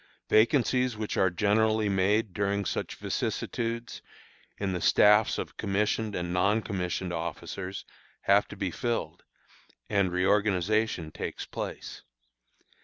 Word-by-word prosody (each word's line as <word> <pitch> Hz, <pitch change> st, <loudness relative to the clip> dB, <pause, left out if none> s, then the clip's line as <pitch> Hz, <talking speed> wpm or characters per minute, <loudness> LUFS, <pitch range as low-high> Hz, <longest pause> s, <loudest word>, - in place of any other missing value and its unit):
Vacancies 125 Hz, +1 st, +3 dB
which 110 Hz, -1 st, -3 dB
are 95 Hz, -, +3 dB
generally 110 Hz, +4 st, +2 dB
made 100 Hz, +1 st, +1 dB
during 100 Hz, 0 st, 0 dB
such -, -, -3 dB
vicissitudes, 115 Hz, +1 st, -3 dB, 0.6 s
in 100 Hz, -2 st, -2 dB
the 90 Hz, -, -3 dB
staffs 105 Hz, +1 st, +5 dB
of -, -, -6 dB
commissioned 105 Hz, +2 st, 0 dB
and 90 Hz, 0 st, -3 dB
non 100 Hz, +5 st, +2 dB
commissioned 90 Hz, -2 st, -3 dB
officers, 90 Hz, +3 st, -5 dB, 0.4 s
have 100 Hz, +1 st, +3 dB
to 100 Hz, -, -10 dB
be 95 Hz, -2 st, -2 dB
filled, 120 Hz, +4 st, -3 dB, 0.7 s
and 100 Hz, -3 st, +2 dB
reorganization 100 Hz, -1 st, +1 dB
takes -, -, -5 dB
place. -, -, -6 dB
100 Hz, 115 wpm, -28 LUFS, 95-110 Hz, 0.7 s, staffs